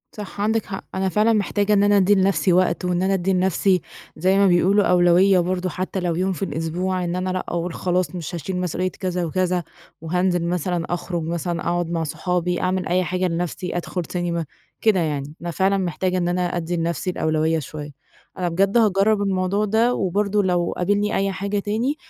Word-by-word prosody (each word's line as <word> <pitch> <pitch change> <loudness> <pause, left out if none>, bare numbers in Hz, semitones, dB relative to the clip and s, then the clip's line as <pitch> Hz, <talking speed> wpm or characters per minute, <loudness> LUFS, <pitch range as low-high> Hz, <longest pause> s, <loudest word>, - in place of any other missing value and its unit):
صح 205 -1 -7
عندِك 220 +1 +1
حق، 195 -1 -6
أنا 190 0 0
فعلًا 215 +4 +3
محتاجة 205 0 +1
إن 200 0 +4
أنا 205 0 +4
أدّي 195 +2 +4
لنفْسِي 190 -1 +2
وقت 185 0 +2
وإن 180 0 0
أنا 195 +1 +2
أدّي 190 0 +1
لنفْسِي- 185 0 +2 0.4
زي 185 +4 +2
ما 200 -1 +5
بيقولوا- 190 +3 +4
أولوية 180 +2 +5
برضه، 185 +1 -1
حتى 185 +2 -3
لو 175 -2 -1
يوم 185 +2 0
في 195 - -5
الأسبوع، 180 +4 -2
إن 175 0 -2
أنا 185 +1 -2
لأ 185 0 -2
أقول 170 0 -3
خلاص 180 -1 -1
مش 175 0 -5
هاشيل 180 +3 -4
مسئولية 180 +1 -1
كذا 180 -2 -3
وكذا، 180 +1 0 0.4
وهانزل 175 +1 0
مثلًا 175 0 -1
أخرج 175 -1 -3
مثلًا 170 +1 -2
أقعد 175 -1 -1
مع 165 -1 -1
صحابي، 180 +2 -1
أعمل 185 -2 0
أي 180 +2 +2
حاجة 180 +2 -1
لنفْسِي، 175 +1 -3
أدخل 180 +1 -3
سينما، 170 -2 -2 0.4
كده 215 -4 +3
يعني. 150 -2 -2
أنا 170 0 -3
فعلًا 190 +3 +2
محتاجة 185 0 -1
إن 175 - 0
أنا 180 +1 0 0.2
أدّي 170 +1 -2
لنفْسِي 170 +1 -2
الأولوية 160 -1 0
شوية. 150 +1 -7 0.5
أنا 180 -1 -1
بجد 195 +6 +2
هاجرب 210 -1 +3
الموضوع 195 +1 0
ده 225 +4 +2
وبرضه 200 +1 0
لو 175 -2 0
قابلني 205 +3 +1
أي 195 0 +1
حاجة 200 +1 -2
تاني، 225 +8 -1
180 Hz, 190 wpm, -22 LUFS, 175-195 Hz, 0.5 s, ما